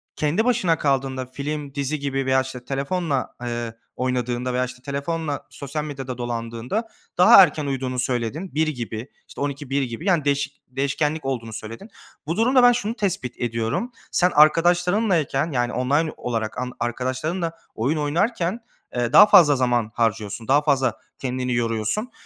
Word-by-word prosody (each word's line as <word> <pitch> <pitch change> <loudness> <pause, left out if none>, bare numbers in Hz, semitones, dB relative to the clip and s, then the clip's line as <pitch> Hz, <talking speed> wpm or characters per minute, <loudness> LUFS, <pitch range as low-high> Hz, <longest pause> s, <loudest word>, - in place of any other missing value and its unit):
kendi 165 +10 +1
başına 220 -10 +2
kaldığında, 135 -2 0
film, 140 +2 -5
dizi 140 +1 -2
gibi 135 -1 -2
veya 130 0 +3
işte 130 -2 -8
telefonla, 140 +1 -2
eee, 120 -1 -3 0.2
oynadığında 125 0 -1
veya 125 0 +1
işte 125 0 -10
telefonla 145 +2 -3
sosyal 140 +2 -5
medyada 135 -4 -6
dolandığında 120 - -3 0.3
daha 185 +2 +9
erken 150 -3 0
uyuduğunu 130 -2 -2
söyledin. 130 +8 -2
01.00 160 0 +2
gibi, 120 -3 -4 0.2
işte - - -9
00.00-01.00 140 -1 -2
gibi. 125 - -6
Yani 175 -7 +2
değişik 140 -1 -1
değişkenlik 140 +3 -1
olduğunu 120 -4 -3
söyledin. 115 - -8 0.4
Bu 165 - -2
durumda 255 +3 +4
ben 245 - +8
şunu 230 -1 -2
tespit 185 - -2
ediyorum. 115 - -1 0.2
Sen 180 +1 +3
arkadaşlarınlayken, 170 0 +3
yani 120 -2 0
online 145 +6 +1
olarak 115 -3 -3
ark 125 0 -3
arkadaşlarınla 130 +8 -2 0.2
oyun 135 +8 0
oynarken, 175 +7 0 0.4
eee, 120 0 -1
daha - - +10
fazla 155 -8 +7
zaman 120 -3 +1
harcıyorsun. 110 -1 -1
Daha 145 +3 +4
fazla 135 -5 +2 0.3
kendini 125 -1 -2
yoruyorsun. 115 - -1
135 Hz, 150 wpm, -23 LUFS, 125-160 Hz, 0.4 s, daha